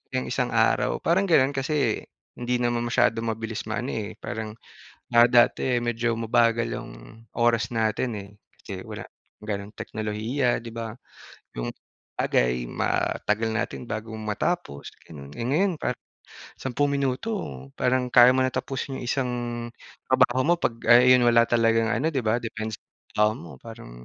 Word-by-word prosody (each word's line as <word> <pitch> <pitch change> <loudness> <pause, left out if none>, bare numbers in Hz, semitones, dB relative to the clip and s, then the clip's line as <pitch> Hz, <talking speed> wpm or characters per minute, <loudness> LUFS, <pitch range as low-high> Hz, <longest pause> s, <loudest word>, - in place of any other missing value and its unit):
yung 65 0 -1
isang - - -1
araw - - +2
parang 180 +4 +2
ganoon. 140 -7 +4
Kasi 135 -4 0 0.3
hindi 125 0 -1
naman 120 0 0
masyado 120 -1 +2
mabilis 115 -1 -4
maano, 120 +5 -2
eh, 110 -2 -4
parang, 110 -2 -5 0.6
ah, 120 0 +8
dati 120 +1 +4
medyo 120 0 0
mabagal 115 0 +2
yung - - -6 0.4
oras 120 -1 +2
natin, 110 +3 0
eh. 100 - -10 0.3
Kasi - - -7
wala - - -6 0.4
ganoong 105 0 -5
teknolohiya 110 +4 -1
'di 115 - -8
ba? 115 -1 -4 0.7
Yung - - -3 0.5
bagay, 60 0 +1
matagal 110 +2 0
natin 115 - -3
bago 110 +1 -5
matapos, 110 - -3 0.2
ganon. 70 -3 -10
Eh, - - -4
ngayon 175 +6 +2
parang - - -2 0.6
10 135 +3 0
minuto 140 - -1 0.5
parang 125 0 +1
kaya 120 +1 +7
mo 130 - +2
na - - +1
tapusin 135 0 -3
yung - - -5
isang 125 -1 0 0.8
trabaho 130 +2 +4
mo, 170 - +4
pag 115 - +1 0.2
ay 125 +2 +8
yun - - +1
wala 115 0 +5
talagang 115 -1 +3
ano 155 - +1
'di 135 - 0
ba 110 +2 +2
depends 110 -2 -5
sa - - -79 0.5
trabaho - - -3
mo. 85 - -10
Parang 115 - -10
120 Hz, 150 wpm, -25 LUFS, 110-125 Hz, 0.8 s, ah